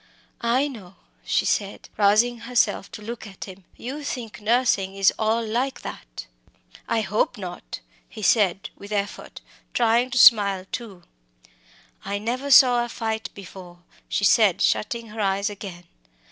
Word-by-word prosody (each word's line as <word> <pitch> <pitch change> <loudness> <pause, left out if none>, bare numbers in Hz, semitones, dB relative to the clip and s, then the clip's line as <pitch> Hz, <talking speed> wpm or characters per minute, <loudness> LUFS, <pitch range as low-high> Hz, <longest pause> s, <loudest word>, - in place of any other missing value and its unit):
"I 280 +2 +2
know," 200 -9 -11 0.3
she - - 0
said, 200 -1 -2
rousing 215 +4 +3
herself 230 -4 0
to 210 - -9
look 230 0 -7
at 195 -2 -10
him; 190 -1 -12
"you 275 +5 -6
think 235 -7 -6
nursing 210 -4 +1
is 195 -1 +3
all 225 +1 +1
like 245 +5 -2
that!" - - -9 0.6
"I 225 - +1
hope 210 +1 -1
not!" 175 - -8 0.3
he 215 - -9
said, 195 -1 +2
with 200 +1 -12
effort, 205 -1 -4 0.3
trying 235 +1 +2
to 250 - -3
smile 200 -6 +6
too. 205 -8 -7 1.0
"I 200 +1 -3
never 245 +7 -3
saw 250 -3 +7
a 240 - -6
fight 220 -1 -3
before," 180 -2 -12 0.3
she - - -1
said, 200 -3 +4
shutting 230 +1 0
her 215 +1 -6
eyes 200 +1 0
again. 190 -4 -9
215 Hz, 145 wpm, -23 LUFS, 195-235 Hz, 1.0 s, saw